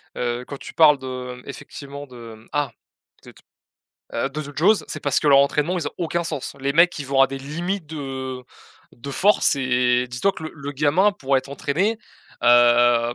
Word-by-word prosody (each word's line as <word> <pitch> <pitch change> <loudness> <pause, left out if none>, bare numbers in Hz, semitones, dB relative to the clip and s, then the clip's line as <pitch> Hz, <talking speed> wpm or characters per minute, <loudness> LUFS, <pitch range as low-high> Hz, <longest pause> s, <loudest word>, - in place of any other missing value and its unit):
heu, 120 0 -3
quand 140 - -7
tu - - -10
parles 150 -3 +6
de, 130 -1 -6
hem, - - -17
effectivement 140 +1 -9
de, 120 -3 -11
hem. 110 +1 -19
Ah! 145 -3 0 0.5
De - - -12
te, - - -20 0.7
heu, - - 0
de 150 +3 -5
JoJo's, 160 +9 +2
c'est - - -6
parce 140 -2 +1
que - - -3
leur 140 -1 +7
entraînement, 150 +5 +2
ils 160 -5 -2
ont - - -15
aucun 170 0 -1
sens. 155 -5 -5
Les 140 +1 0
mecs, 170 +3 +4
ils 140 - -6
vont 135 0 +1
à 135 - +7
des 135 +1 -6
limites 170 +6 -4
de, 155 0 -6 0.4
heu, - - -29 0.5
de 120 +4 -9
force 190 +1 +3
et 125 -1 +1
dis-toi 125 +11 0
que 160 - -9
le 155 - -6
le 145 -2 -6
gamin, 150 +8 +3
pour 140 -8 0
être 130 - -2
entraîné, 165 +11 -1 0.4
hem, 120 0 +5
140 Hz, 205 wpm, -22 LUFS, 125-155 Hz, 0.7 s, leur